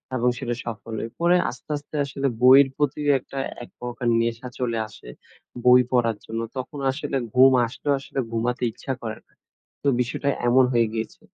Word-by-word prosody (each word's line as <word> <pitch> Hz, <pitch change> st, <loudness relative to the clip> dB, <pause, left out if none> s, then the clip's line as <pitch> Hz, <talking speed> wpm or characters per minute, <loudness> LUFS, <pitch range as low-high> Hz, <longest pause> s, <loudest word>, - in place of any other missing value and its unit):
এবং 125 Hz, 0 st, +2 dB
সেটা 120 Hz, -2 st, -3 dB
সফল 115 Hz, -1 st, -6 dB
হয়। 115 Hz, -, -5 dB
পরে 175 Hz, +1 st, +4 dB
আস্তে, 125 Hz, -, -11 dB
আস্তে 145 Hz, +1 st, -11 dB
আসলে 140 Hz, 0 st, -2 dB
বইয়ের 135 Hz, +2 st, +8 dB
প্রতি 145 Hz, 0 st, 0 dB, 0.2 s
একটা 135 Hz, +2 st, -8 dB, 0.2 s
একপ্রকার 120 Hz, 0 st, -6 dB
নেশা 115 Hz, +2 st, -2 dB
চলে 115 Hz, -2 st, -1 dB
আসে -, -, -14 dB, 0.6 s
বই 125 Hz, 0 st, +8 dB
পড়ার 115 Hz, -4 st, +2 dB
জন্য। 115 Hz, +1 st, -4 dB, 0.2 s
তখন 140 Hz, +3 st, -5 dB
আসলে 140 Hz, 0 st, -3 dB, 0.2 s
ঘুম 130 Hz, +1 st, +7 dB, 0.2 s
আসলেও 140 Hz, +4 st, -2 dB
আসলে 135 Hz, -, -6 dB
ঘুমাতে 120 Hz, +2 st, -1 dB
ইচ্ছা 135 Hz, -, -5 dB
করে 110 Hz, -2 st, -5 dB
না। -, -, -33 dB, 0.5 s
তো 140 Hz, -, 0 dB
বিষয়টা 125 Hz, +3 st, -2 dB, 0.2 s
এমন 130 Hz, +2 st, +5 dB
হয়ে 115 Hz, -1 st, +3 dB
গিয়েছে। 110 Hz, -1 st, -5 dB
125 Hz, 170 wpm, -24 LUFS, 115-135 Hz, 0.6 s, বইয়ের